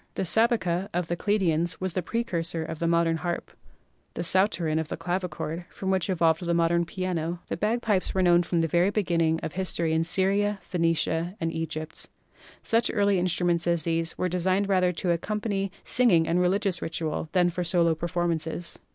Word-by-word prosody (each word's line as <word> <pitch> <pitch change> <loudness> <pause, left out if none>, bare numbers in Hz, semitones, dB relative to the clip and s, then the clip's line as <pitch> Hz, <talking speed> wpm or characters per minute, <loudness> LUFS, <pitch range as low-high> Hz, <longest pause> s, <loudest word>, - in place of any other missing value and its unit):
The - - -1
Sabeca 195 -3 +2
of 175 -2 -1
the 175 - 0
Chaldeans 175 -4 0
was 185 -2 -1
the 185 - -1
precursor 170 -6 -2
of 160 - -6
the 170 - 0
modern 170 -1 +2
harp, 170 +2 -4 0.6
the - - -3
Psauterin 175 -3 +2
of 160 - -3
the - - -5
clavichord, 175 -1 -3
from 190 -1 -3
which 190 0 +1
evolved 165 -2 +2
the 170 0 0
modern 170 0 +2
piano. 175 -1 -3
The - - -1
bagpipes 215 -3 0
were 190 - +2
known 175 -1 +5
from 170 -1 0
the 165 - +1
very 175 +4 +2
beginning 170 -6 +1
of - - -5
history 170 -3 -1
in 160 0 +2
Syria, 195 +4 +1
Phenicia 165 0 0
and 165 -1 -2
Egypt. 160 -1 -5 0.5
Such 230 +1 +2
early 200 -3 +2
instruments 175 -1 +1
as 170 -2 +1
these 165 0 -1
were 185 - 0
designed 185 +3 0
rather 185 -2 +2
to 175 +1 -1
accompany 195 +2 -2
singing 190 -10 +3
and 175 +2 +2
religious 185 0 +1
ritual 160 -1 -3
than 180 -2 +3
for 180 +1 -3
solo 170 -1 +2
performances. 170 0 -2
175 Hz, 175 wpm, -26 LUFS, 165-190 Hz, 0.6 s, known